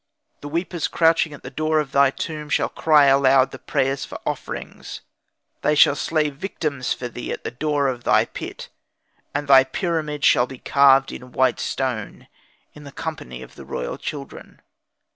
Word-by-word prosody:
The 145 - -8
weepers 170 +1 -2
crouching 165 -1 +2
at 145 - -11
the 125 - -8
door 155 +3 0
of 145 -3 -3
thy 140 0 +5
tomb 150 +2 -6
shall - - +1
cry 150 -3 +4
aloud 135 -1 +4
the 135 - -9
prayers 135 0 -1
for - - -8
offerings: - - -6 0.6
they 150 - +2
shall 145 - +6
slay 155 0 0
victims 145 -4 -4
for 125 - -2
thee 120 0 -7
at - - -5
the - - -4
door 145 +2 0
of 125 -2 -3
thy - - +4
pit; - - -8 0.7
and 145 0 -2
thy 135 -1 +8
pyramid 150 0 -2
shall 120 - +4
be 130 - -10
carved 135 +1 +4
in 125 0 -10
white 130 0 +2
stone, 125 -6 -3 0.5
in 150 - -13
the 140 - -10
company 65 - -6
of - - -14
the - - -12
royal 60 - -5
children. 140 -2 -8
140 Hz, 175 wpm, -22 LUFS, 130-155 Hz, 0.7 s, thy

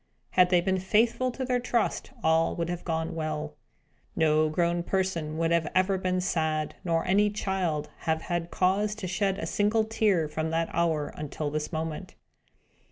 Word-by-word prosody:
Had 180 -1 +5
they 180 -1 +4
been 190 +1 0
faithful 230 +6 +2
to 260 +1 -4
their 250 -1 +1
trust, 240 -1 -1
all 160 +1 +3
would 170 0 -2
have 175 0 -4
gone 160 -1 -2
well. 155 -1 -3 0.6
No 155 -1 +3
grown 170 +2 +1
person 170 -4 -1
would 165 0 +1
ever 170 -2 +2
have 185 0 +2
been 185 0 0
sad, 160 -4 -1
nor 165 -3 0
any 205 +3 +3
child 185 -7 -2 0.2
have 160 0 +1
had 175 -1 -2
cause 200 +4 +1
to 215 -3 -6
shed 190 +1 0
a - - -3
single 210 +2 +2
tear, 215 -7 +1
from 155 +1 -2
that 165 0 0
hour 160 -3 +1
until 150 0 -4
this 150 0 -3
moment. 160 -1 -4
175 Hz, 170 wpm, -28 LUFS, 160-195 Hz, 0.6 s, Had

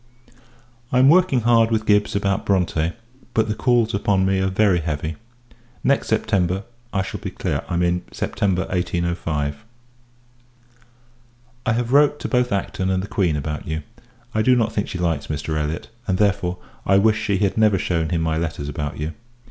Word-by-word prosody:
I 125 - +2
am 130 +2 +6
working 170 -6 +4
hard 115 0 +4
with 110 -1 0
Gibbs 105 0 +2
about 100 -1 0
Bronte, 85 -4 +1 0.4
but 110 -1 +3
the 105 - 0
calls 120 -1 +2
upon 100 -1 +2
me 95 0 +2
are 95 - +1
very 95 -1 +3
heavy. 80 0 -3 0.7
Next - - +2
September, 95 +1 +1 0.3
I 95 -1 0
shall - - -6
be - - -5
clear; - - -3
I 85 - 0
mean, 90 0 +1
September 95 -2 -1
1805. 85 -5 -2 2.0
I 110 - +3
have 120 +1 -1
wrote 145 +1 +5
to - - -2
both 125 -2 +1
Acton 95 -1 -1
and 95 0 0
the - - -5
Queen 90 -8 +1
about 75 +1 -4
you. 80 0 -3 0.5
I 110 - +1
do 125 +3 +4
not 115 -2 +1
think 105 - -1
she - - -5
likes 85 -4 -1
Mr. 75 +1 -3
Elliot; 75 +5 -3 0.2
and, 95 -2 +1
therefore, 100 -3 +1 0.3
I 95 - +4
wish 110 +2 +3
she 100 -3 +1
had 100 0 +1
never 110 -3 +4
shewn 85 -3 -1
him 85 -1 0
my 80 -1 0
letters 80 -3 -3
about 75 0 -4
you. 75 +2 -3
95 Hz, 180 wpm, -22 LUFS, 85-110 Hz, 2.0 s, am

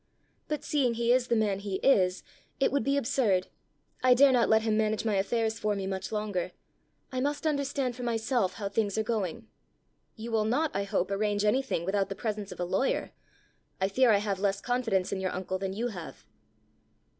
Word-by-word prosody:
But 300 -1 -3
seeing 260 -6 +1
he 235 +1 +1
is 250 -1 +2
the 235 - +2
man 210 -3 +1
he 200 -1 -4
is, 190 -6 +3 0.4
it 270 - +3
would 280 +1 +1
be 275 +1 +1
absurd. 225 -8 +1 0.5
I 255 -1 +6
dare 275 +2 +6
not 245 -2 +3
let 220 0 +4
him 220 -1 +1
manage 215 0 0
my 220 - +1
affairs 220 +3 0
for 210 -1 0
me 195 -1 -3
much 190 +1 -4
longer. 205 -4 -2 0.6
I 255 - -2
must 290 +4 -1
understand 280 -4 0
for 250 - -8
myself 230 -3 0
how 205 -3 -3
things 205 0 -1
are 220 - +2
going." 220 -1 -3 0.7
"You 230 +1 -7
will 220 -1 +2
not, 285 +8 +1
I 200 0 -1
hope, 195 -1 -1
arrange 205 +1 0
anything 250 -5 +1
without 195 +1 0
the 195 - -4
presence 210 -1 -4
of - - -9
a 175 - 0
lawyer! 260 +9 0 0.7
I 190 0 +1
fear 255 +5 +3
I 210 - +6
have 200 -2 -2
less 195 0 0
confidence 225 -6 0
in 195 - -2
your 185 -1 -2
uncle 185 +1 -3
than 190 0 -3
you 235 +4 -2
have!" 175 -7 -9
215 Hz, 200 wpm, -29 LUFS, 195-245 Hz, 0.7 s, I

